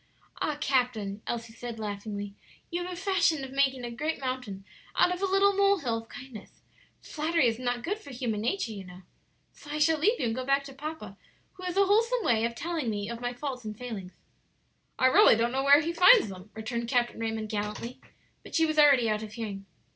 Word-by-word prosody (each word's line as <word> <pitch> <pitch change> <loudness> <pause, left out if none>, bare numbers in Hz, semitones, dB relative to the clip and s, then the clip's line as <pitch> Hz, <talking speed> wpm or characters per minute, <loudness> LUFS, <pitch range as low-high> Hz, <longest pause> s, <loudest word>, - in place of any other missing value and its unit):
"Ah, 300 -1 -1
captain," 245 -8 0
Elsie 230 -1 -4
said, 235 0 -7
laughingly, 205 -1 -5 0.4
"you 345 +1 -2
have 360 - -5
a - - -5
fashion 375 -5 +1
of 265 - -7
making 270 -2 +1
a 240 - -5
great 305 +7 -3
mountain 250 -7 -4 0.3
out 360 - +4
of 360 - -6
a - - +2
little 390 +1 +4
mole 400 0 +4
hill 235 -9 -2
of 225 - -14
kindness. 260 -5 -11 0.4
Flattery 315 -1 0
is 230 0 +1
not 245 -1 -2
good 410 +5 -2
for 285 - -13
human 235 -5 -3
nature, 240 - -1
you 200 -3 -7
know, 180 0 -13 0.5
so 290 - -15
I 300 - -3
shall 310 +1 +3
leave 435 +10 +2
you - - 0
and 225 - 0
go 255 +2 -3
back 275 +1 +2
to 275 -1 -10
papa, 270 -9 -7 0.4
who 370 - -14
has 360 +1 -3
a 395 - +5
wholesome 455 +4 +2
way 230 -6 +2
of 235 0 -3
telling 320 -3 -2
me 205 0 -3
of 235 0 -7
my 245 0 -2
faults 255 0 -5
and 215 -1 -6
failings." 215 -7 -7 0.8
"I - - +2
really 260 -3 +7
don't 230 +2 +1
know 265 +1 0
where 285 +2 +7
he 335 +2 -2
finds 365 - +7
them," 185 +2 -10
returned 235 +2 -4
Captain 240 -1 0
Raymond, 225 -1 -3
gallantly; 210 +3 -4 0.4
but - - -9
she 325 - +4
was 310 -1 0
already 280 -6 +6
out 215 -1 0
of 215 -1 -8
hearing. 200 -3 -6
250 Hz, 220 wpm, -28 LUFS, 220-310 Hz, 0.8 s, really